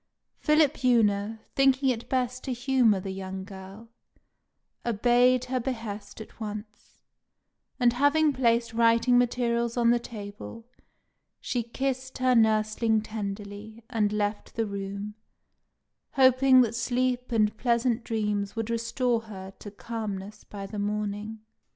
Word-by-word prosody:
Philipjewna, 235 -8 +2
thinking 270 0 +3
it 240 -2 -3
best 255 -1 -1
to 260 - -2
humour 240 -4 +2
the 190 +1 -5
young 190 0 -6
girl, 195 +3 -11 1.0
obeyed 245 +2 +3
her 255 0 -1
behest 225 -5 -5
at 220 - -11
once; 210 -1 -8 0.8
and 240 -2 +4
having 285 +3 +3
placed 235 -3 +1
writing 230 +2 +4
materials 235 -1 0
on 235 -1 +4
the 240 - +3
table, 215 0 -9 0.7
she 245 - -2
kissed 260 +2 -3
her 255 0 +3
nursling 220 -1 +2
tenderly, 210 +1 -7
and 215 -3 +1
left 210 0 -2
the 225 - 0
room, 200 +1 -5 1.0
hoping 260 -1 +6
that 230 -2 +1
sleep 250 +1 -1
and 215 -2 +2
pleasant 235 0 +1
dreams 210 -3 -2
would 225 0 -3
restore 230 +1 0
her 190 -3 -9
to 205 - -8
calmness 210 -1 -6
by 200 -1 -8
the 205 +1 -6
morning. 210 +1 -3
230 Hz, 125 wpm, -27 LUFS, 210-250 Hz, 1.0 s, hoping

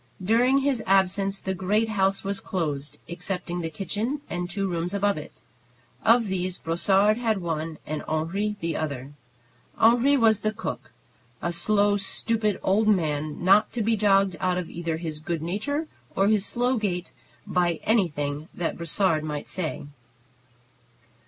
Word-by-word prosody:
During 240 +7 +4
his 270 -4 +1
absence 195 +1 +2
the 190 - -2
great 205 +5 +1
house 195 -2 +1
was 195 0 -2
closed, 150 -6 -3
excepting 180 0 -4
the 165 - -3
kitchen 205 - -3
and 175 0 -3
two 195 +2 -1
rooms 175 +1 -2
above 200 0 +2
it. 150 - -10 0.6
Of 230 +1 +5
these 185 -2 -2
Brossard 195 +6 +2
had 225 -3 +1
one 165 -2 -3
and 155 0 -3
Henri 180 +7 -1
the 165 -1 -1
other. 140 -3 -4 0.6
Henri 245 +5 +5
was 220 -4 +4
the 215 +1 -1
cook; - - -6 0.5
a 170 - -2
slow, 205 +3 +2
stupid 215 +1 -1
old 215 +3 +2
man, 155 -6 0
not 200 +3 +5
to 235 - -1
be 225 +1 +2
jogged 195 -2 +3
out 180 -1 +1
of 180 -2 -4
either 165 -1 -3
his 160 -2 -4
good 165 0 -3
nature 285 - -2 0.3
or 195 +1 +3
his 210 -2 +2
slow 245 +1 +1
gait 180 -5 -2 0.3
by 175 -2 +1
anything 150 -8 0
that 175 - -2
Brossard 170 -1 +1
might 150 -2 -4
say. 165 -5 -3
190 Hz, 150 wpm, -26 LUFS, 165-215 Hz, 0.6 s, Of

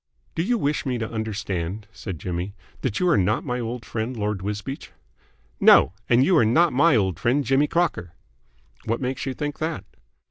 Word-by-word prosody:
"Do - - -1
you 235 +7 +1
wish 150 -6 0
me 130 -2 -1
to 115 -1 -3
understand," 105 -3 -3
said 100 -5 -7
Jimmy, 90 +5 -4 0.3
"that 110 -5 -1
you 180 - +2
are 170 - +4
not 100 +4 +1
my 125 0 -2
old 120 0 -5
friend, 115 +2 -4
Lord 105 -2 -2
Wisbeach?" 105 +8 -5 0.7
"No. - - +6 0.2
And 120 +2 +5
you're 175 -9 +4
not 160 +10 +3
my 145 +3 +4
old 95 -5 +1
friend, 130 +5 +2
Jimmy 135 +2 +2
Crocker." 155 - -1 0.7
"What 115 +1 -1
makes 130 +1 -3
you 130 - -3
think 145 -1 -4
that?" 160 0 -3
120 Hz, 180 wpm, -24 LUFS, 105-145 Hz, 0.7 s, No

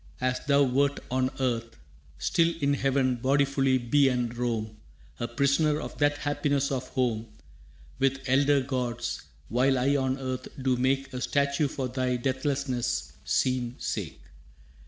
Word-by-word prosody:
As 125 0 0
thou 140 0 +5
wert 140 +2 +2
on 130 0 +1
earth, 115 -3 -1 0.4
still 170 0 +2
In 140 -1 +2
heaven 135 -2 +1
bodifully 135 +1 +2
be 135 +3 +3
and 120 -2 -1
roam, 115 -3 -2 0.4
A 120 - -1
prisoner 140 +5 +2
of - - -6
that 145 0 +3
happiness 145 -1 0
of 130 -1 -2
home, 115 -4 -1 0.7
With 135 0 +2
elder 140 +1 +3
gods, 120 -3 -3 0.3
while 130 +4 +2
I 135 +3 +2
on 130 -1 0
earth 130 -1 -4
do 130 -1 +1
make 135 +1 0
A 125 - -4
statue 140 +2 +1
for 135 -2 -3
thy 125 0 -1
deathlessness' 130 - -1
seen 120 - 0
sake. - - -4
130 Hz, 140 wpm, -28 LUFS, 125-140 Hz, 0.7 s, thou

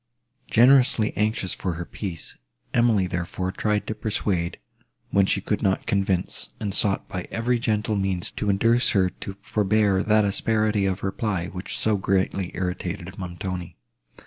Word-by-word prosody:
Generously 125 -2 +5
anxious 105 -3 0
for 90 - -3
her 85 +1 -5
peace, 90 -5 -6 0.4
Emily, 115 -5 +3
therefore, 90 +1 -3
tried 105 +1 0
to - - -3
persuade, 100 -5 -2 0.5
when 100 -1 +4
she 100 - +1
could 105 - -1
not 95 -2 +1
convince, 95 -2 0
and 100 -2 -3
sought 100 0 +3
by 90 -2 -5
every 120 +1 0
gentle 110 -2 0
means 95 -3 0
to 105 - -2
induce 115 +5 +3
her 95 -1 +3
to 100 - -8
forbear 105 -2 +2
that 105 0 +3
asperity 105 0 +1
of 95 0 -2
reply, 95 -3 -2
which 90 +1 -5
so 110 -2 +2
greatly 95 -1 0
irritated 90 -1 -4
Montoni. 90 -1 -5
100 Hz, 145 wpm, -24 LUFS, 95-110 Hz, 0.5 s, Generously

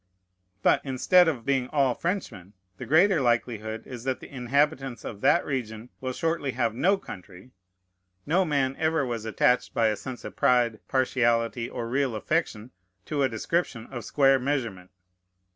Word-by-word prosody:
But, - - +4
instead 155 +7 +4
of 130 -8 -2
being 135 -2 +1
all 135 -3 +2
Frenchmen, 145 - -4 0.2
the 125 - -8
greater 165 - +4
likelihood 115 -2 -1
is 125 -3 -8
that 130 0 -2
the - - -12
inhabitants 135 -1 0
of 105 -2 -7
that - - +3
region 115 -4 -4
will 130 -1 -3
shortly 160 -1 -2
have 115 -2 0
no 190 - +2
country. 95 - -11 0.7
No 175 +5 +2
man 140 -5 0
ever 160 -2 +1
was 115 -3 -4
attached 115 +3 +1
by 115 -1 +3
a 105 - 0
sense 125 +2 -8
of - - -8
pride, 120 -3 +2
partiality, 120 -3 +1
or 120 -2 -5
real 130 -1 0
affection, 120 -2 -2 0.3
to 150 -2 -2
a 135 - +3
description 115 0 -2
of 120 -3 -6
square 135 +2 +3
measurement. 120 -9 -3
125 Hz, 160 wpm, -26 LUFS, 115-140 Hz, 0.7 s, But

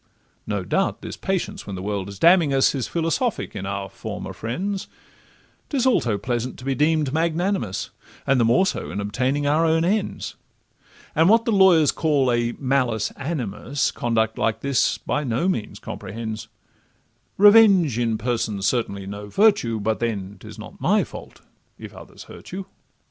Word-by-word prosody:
No - - -2
doubt - - -1
this - - -6
patience, 195 - -3
when 100 - -5
the 90 - -6
world 100 -1 -3
is 100 - -9
damning 170 - +5
us, 135 - +4
Is 135 -4 -2
philosophic 170 +9 -1
in 95 - -4
our 100 0 -3
former - - -7
friends; 190 - -4 0.8
'Tis 265 -4 0
also 120 - +2
pleasant 120 +2 -3
to 130 - -11
be 135 - 0
deem'd 150 0 +1
magnanimous, 160 - -1 0.3
The 135 -3 +3
more 120 +11 +4
so - - -3
in - - -4
obtaining 130 +8 -1
our 150 +3 +3
own 165 0 +2
ends; 205 +3 -1 0.8
And 160 +3 +4
what 230 +2 +5
the 230 - +1
lawyers 185 -7 +5
call 145 -6 +1
a 120 0 0
'malus 130 -5 0
animus' 135 - -2
Conduct 110 -2 -1
like 115 - 0
this 140 -2 +1
by 150 - -2
no 130 +7 0
means 110 - -2
comprehends; 110 +1 -6 0.9
Revenge 200 - +6
in 115 -2 0
person 110 -3 -2
's - - +1
certainly 100 -4 -1
no 100 +1 -7
virtue, 195 - +2
But 110 +1 -1
then 100 -4 -3
'tis - - -11
not - - -11
my - - +3
fault, - - -11 0.4
if - - -10
others - - -12
hurt - - -13
you. 190 +1 -5
130 Hz, 165 wpm, -23 LUFS, 110-170 Hz, 0.9 s, Revenge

